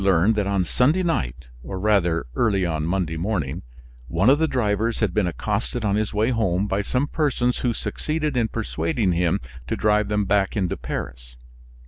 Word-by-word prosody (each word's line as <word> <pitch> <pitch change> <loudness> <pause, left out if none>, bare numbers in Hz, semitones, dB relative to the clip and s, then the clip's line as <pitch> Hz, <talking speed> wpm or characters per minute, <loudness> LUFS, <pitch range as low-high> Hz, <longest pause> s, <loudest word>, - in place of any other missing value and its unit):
Here 95 - +2
he - - +6
learned 90 +7 +4
that 100 -2 +1
on 100 -2 +1
Sunday 150 - +2
night, 70 - -1 0.2
or 95 +8 -6
rather, 90 -8 +2
early 100 - +1
on 80 -3 -1
Monday 85 -3 -1
morning, 85 -7 -2 0.5
one 100 - +3
of 145 - +4
the 160 - +3
drivers 115 -3 0
had 105 -6 +1
been 105 -2 +2
accosted 110 +6 -2
on 100 -1 +2
his 110 0 0
way 110 +4 +1
home 100 -5 +1
by 100 0 0
some 125 +6 0
persons 135 -6 0
who 125 - +1
succeeded 155 +6 -2
in 120 -2 +2
persuading 85 - -1
him 85 -1 +1 0.3
to - - -1
drive 105 -1 +2
them 105 -1 0
back 100 +2 +1
into 95 -4 0
Paris. - - -6
105 Hz, 190 wpm, -23 LUFS, 90-115 Hz, 0.5 s, he